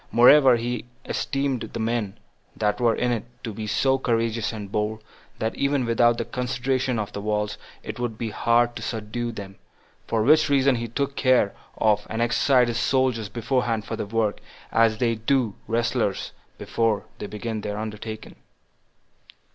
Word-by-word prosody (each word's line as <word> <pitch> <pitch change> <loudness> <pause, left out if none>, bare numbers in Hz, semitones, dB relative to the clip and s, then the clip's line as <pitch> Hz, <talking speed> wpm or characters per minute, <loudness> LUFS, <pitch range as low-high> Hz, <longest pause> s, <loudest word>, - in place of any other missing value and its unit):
Moreover, 130 +2 +7
he 120 0 -3 0.2
esteemed 135 -3 -1
the 115 - -4
men 110 -3 -1 0.4
that 105 +2 0
were 115 -2 +3
in 125 - 0
it 115 -2 -2 0.2
to 115 -3 -4
be 110 +1 -5
so 135 +5 +2
courageous 115 -2 0
and 105 -3 -7
bold, 110 +1 -2 0.3
that 110 +1 -1
even 140 -2 0
without 120 0 +3
the 115 - -2
consideration 125 0 -1
of 105 -2 -3
the 100 - -4
walls, 105 0 -1 0.2
it - - -6
would 120 -3 -3
be 115 -2 -3
hard 120 +2 +2
to - - -6
subdue 115 +1 -3
them; 100 -3 -9 0.5
for 110 -1 +1
which 155 +4 +5
reason 135 -2 +4
he 115 0 -3
took 140 +4 -2
care 130 -8 +3 0.2
of 105 -1 +2
and 115 - -3
exercised 125 +1 +3
his 120 0 -1
soldiers 125 -6 +1
beforehand 115 -1 -1
for - - -4
the - - -4
work, 110 -1 0 0.3
as 115 -1 +3
they 115 0 +1
do 115 0 +1
wrestlers 115 -2 0 0.3
before 115 -3 0
they 105 - -4
begin 110 +1 -4
their 105 0 -4
undertaking. 110 0 -6
115 Hz, 165 wpm, -24 LUFS, 110-125 Hz, 0.5 s, Moreover